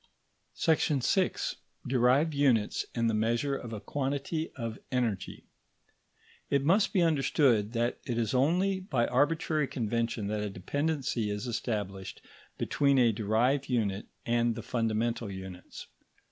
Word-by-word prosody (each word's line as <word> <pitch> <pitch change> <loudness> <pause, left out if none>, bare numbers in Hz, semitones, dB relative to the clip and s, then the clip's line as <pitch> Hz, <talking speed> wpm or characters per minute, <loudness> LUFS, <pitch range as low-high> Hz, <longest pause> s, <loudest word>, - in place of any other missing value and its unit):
§ 155 -4 +2
6. 190 -2 0 0.3
DERIVED 130 +5 +3
UNITS 130 -7 +2
AND 115 -1 +1
THE 115 - +1
MEASURE 115 +6 +1
OF 120 -4 -6
A 110 - -4
QUANTITY 140 +7 -2
OF 115 -3 -5
ENERGY 115 -7 -2 1.1
It 140 -1 +2
must 190 +8 +3
be 185 - +3
understood 135 -8 +2
that 120 +1 0
it 120 - -1
is 115 -3 0
only 180 +9 +2
by 135 -11 0
arbitrary 150 +2 +1
convention 115 -2 -2
that 105 +1 -2
a 105 - -2
dependency 130 - -1
is 105 +3 -3
established 105 -5 -3 0.4
between 140 -1 +2
a 120 -3 +5
derived 115 +7 +1
unit 105 -5 -1 0.2
and 120 0 +1
the - - -6
fundamental 115 -1 -1
units. 95 -1 -9
120 Hz, 130 wpm, -30 LUFS, 110-140 Hz, 1.1 s, a